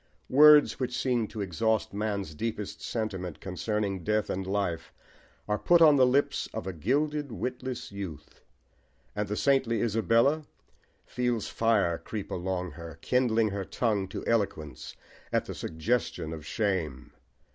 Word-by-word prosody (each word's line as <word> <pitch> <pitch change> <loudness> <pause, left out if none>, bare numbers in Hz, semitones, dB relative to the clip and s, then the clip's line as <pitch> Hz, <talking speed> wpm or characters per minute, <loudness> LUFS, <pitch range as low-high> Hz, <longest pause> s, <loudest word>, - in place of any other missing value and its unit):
Words 150 +2 +7
which 125 -1 -2
seem 120 -4 +1
to 110 - -6
exhaust 100 +5 0
man's 100 -5 -2
deepest 105 +4 -4
sentiment 95 -7 -4
concerning 100 0 -2
death 105 +2 0
and 95 0 -3
life 95 -5 -2 0.6
are 105 0 0
put 175 -1 +5
on 155 -3 +7
the 130 -2 +5
lips 135 +3 +1
of - - -4
a 95 - -4
gilded, 145 - 0
witless 125 +1 -4
youth; 95 -7 -8 0.7
and 105 0 -1
the 105 - -2
saintly 130 -3 +2
Isabella 115 +7 +2 0.6
feels 120 -3 -1
fire 105 -7 +2
creep 105 -3 -6
along 90 0 -2
her, 80 +1 -9
kindling 115 -4 +2
her 100 -1 -3
tongue 105 -1 -1
to - - -6
eloquence 95 - -2 0.4
at - - +1
the - - -6
suggestion 80 -2 -2
of 80 -1 -8
shame. 90 - -2
105 Hz, 140 wpm, -28 LUFS, 95-125 Hz, 0.7 s, Words